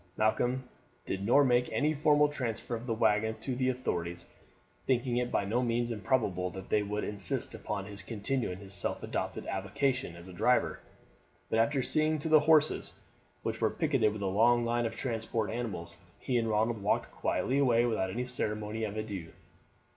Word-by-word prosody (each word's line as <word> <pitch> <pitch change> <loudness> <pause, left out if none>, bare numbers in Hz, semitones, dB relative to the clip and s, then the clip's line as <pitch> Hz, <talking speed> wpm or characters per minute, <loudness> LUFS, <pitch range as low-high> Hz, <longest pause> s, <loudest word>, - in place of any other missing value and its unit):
Malcolm 120 +4 +1 0.4
did 95 0 -3
nor 125 +7 +5
make 125 -2 +2
any 145 +8 +1
formal 150 0 +4
transfer 120 -5 -3
of 115 +2 -7
the 115 - +1
waggon 110 0 +2
to 130 - -3
the 130 +1 +1
authorities, 85 -9 -3 0.6
thinking 125 -1 +1
it 125 0 -1
by 100 - +1
no 115 +5 +1
means 120 0 0
improbable 105 -5 0
that 95 +1 -9
they 105 - +3
would 105 +1 -3
insist 100 -4 +1
upon 100 -2 -4
his 100 0 -8
continuing 110 -2 -2
his 100 0 -8
self 100 - -2
adopted - - -3
avocation 105 +2 -1
as 85 +1 -12
driver; 90 - +1 0.7
but 110 - +2
after 135 +3 +2
seeing 155 +4 +2
to 155 +2 -3
the 155 -1 +7
horses, 155 0 +3 0.5
which 110 0 -3
were 110 - +3
picketed 135 -9 +1
with 105 -1 -5
a - - 0
long 120 +5 +3
line 120 0 +1
of 110 - -7
transport 115 -2 -2
animals, 95 -8 -4 0.2
he 130 - -3
and 115 -1 -1
Ronald 110 +1 +1
walked 100 - 0
quietly 135 +2 0
away 120 -4 +4
without 110 -5 0
any 120 +6 -3
ceremony 110 -3 -2
of 105 0 -5
adieu. 100 -6 -5
115 Hz, 175 wpm, -31 LUFS, 105-125 Hz, 0.7 s, the